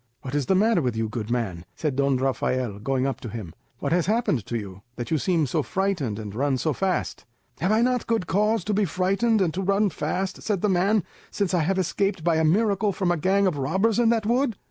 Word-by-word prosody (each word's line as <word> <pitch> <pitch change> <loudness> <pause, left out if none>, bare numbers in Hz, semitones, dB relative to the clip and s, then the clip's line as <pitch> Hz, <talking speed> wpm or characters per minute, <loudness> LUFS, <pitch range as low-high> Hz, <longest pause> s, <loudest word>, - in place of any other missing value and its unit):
"What 130 -1 -6
is 145 -3 0
the 190 - +3
matter 215 -1 +3
with 125 -5 -1
you, 110 0 -1
good 110 0 -5
man?" 105 -8 -2
said 150 -4 -2
Don 140 -1 +2
Rafael, 125 -4 -1
going 130 +4 0
up 135 - -2
to 120 - -6
him. 100 -7 -7 0.2
"What - - -3
has 175 0 +2
happened 210 - 0
to 120 - -2
you, 100 -3 -8
that 120 -1 -6
you 160 - +2
seem 170 -3 +1
so 150 +4 0
frightened 175 - -1
and 105 -2 -6
run 135 +3 0
so 155 +4 0
fast?" 190 +5 -2 0.4
"Have 185 +4 +1
I 220 +2 +3
not 250 -1 0
good 225 -5 0
cause 210 +3 +1
to 210 - -1
be 205 0 +2
frightened 195 +6 +1
and 170 -4 +1
to 190 - -2
run 200 +1 +2
fast," 190 +2 -3
said 205 -5 -1
the 210 - +2
man, 195 +2 +2 0.3
"since 200 -3 -1
I 180 - +3
have 190 +5 0
escaped 190 0 0
by 165 -1 +2
a 160 - +2
miracle 200 +4 +2
from 185 -2 0
a - - +2
gang 195 +5 +2
of 170 -7 0
robbers 195 - +1
in 235 -1 +4
that 225 -2 +1
wood?" 240 0 +1
180 Hz, 240 wpm, -25 LUFS, 130-200 Hz, 0.4 s, in